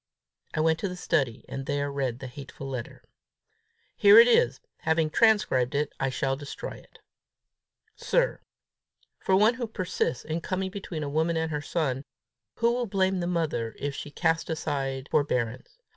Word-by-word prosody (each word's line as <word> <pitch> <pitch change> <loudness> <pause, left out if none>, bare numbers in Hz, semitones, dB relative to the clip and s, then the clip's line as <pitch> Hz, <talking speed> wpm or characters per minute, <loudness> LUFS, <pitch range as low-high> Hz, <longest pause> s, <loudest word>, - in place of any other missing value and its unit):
I 155 - +1
went 160 0 +2
to 200 - -2
the 180 - -5
study, 135 -8 -1
and 135 0 -6
there 145 0 -1
read 135 -4 -2
the 130 - -8
hateful 135 +1 -8
letter. 130 -4 -6 0.9
Here 205 +1 +7
it 230 +1 +10
is. 135 - +3 0.2
Having 160 -1 +1
transcribed 150 - +3
it, 145 0 0
I 135 - +1
shall 135 +1 -1
destroy 140 +1 -7
it. - - -14 1.0
"Sir, - - +1 0.8
For 190 - +2
one 215 +4 +5
who 240 -1 -4
persists 185 - -2
in 160 +2 -2
coming 190 +2 -2
between 180 -6 -5
a - - -3
woman 160 +3 +1
and 160 0 -1
her 150 -1 -2
son, 140 -4 -1 0.5
who 235 0 +2
will 240 0 -1
blame 190 -1 +1
the 175 - -2
mother 155 -10 -1
if 145 0 -3
she 145 - -6
cast 165 +2 0
aside 135 -4 -2
forbearance! 125 - -1
155 Hz, 165 wpm, -27 LUFS, 135-185 Hz, 1.0 s, it